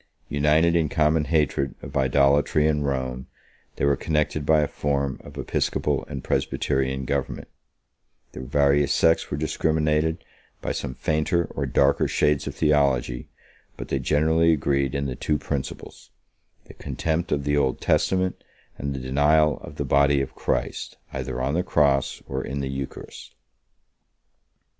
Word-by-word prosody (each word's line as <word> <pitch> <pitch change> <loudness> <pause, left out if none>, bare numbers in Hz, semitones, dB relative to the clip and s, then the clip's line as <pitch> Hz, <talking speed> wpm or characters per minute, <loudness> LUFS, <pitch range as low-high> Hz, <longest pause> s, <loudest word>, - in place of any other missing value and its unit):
United 75 +4 +3
in 80 -3 +2
common 75 0 +2
hatred 70 -4 0
of 70 +2 -9
idolatry 70 +3 +3
and 75 -2 0
Rome, 65 -1 -3 0.5
they - - 0
were 70 0 +3
connected 75 -2 -1
by 80 -1 +5
a 75 - +1
form 70 -2 -2
of - - -12
episcopal - - -1
and 70 -3 -6
presbyterian 65 -1 -1
government; 70 +1 -3 0.8
their - - -8
various 70 +1 +2
sects 80 0 +3
were 70 - -3
discriminated 80 +1 0 0.4
by - - -3
some 65 - -4
fainter 80 +5 0
or - - -3
darker 70 +1 +3
shades 75 -1 +1
of - - -5
theology; 70 -5 +1 0.5
but - - -7
they 70 - 0
generally 80 +4 +3
agreed 70 -2 0
in 70 0 -1
the 65 -2 -3
two 75 - -1
principles, 70 -1 -6 0.6
the - - -13
contempt 80 +2 -3
of 70 -1 0
the 70 +1 +1
Old 70 -3 +1
Testament 95 -1 +1 0.4
and 70 0 -3
the - - -4
denial 75 +4 +2
of - - -11
the - - -3
body 70 0 +3
of 70 -1 -3
Christ, - - -3 0.2
either - - -4
on 65 +2 -1
the 85 - +1
cross 70 -6 +1
or - - -3
in 70 +2 -4
the 70 - -3
eucharist. 65 0 -7
70 Hz, 150 wpm, -24 LUFS, 70-75 Hz, 0.8 s, by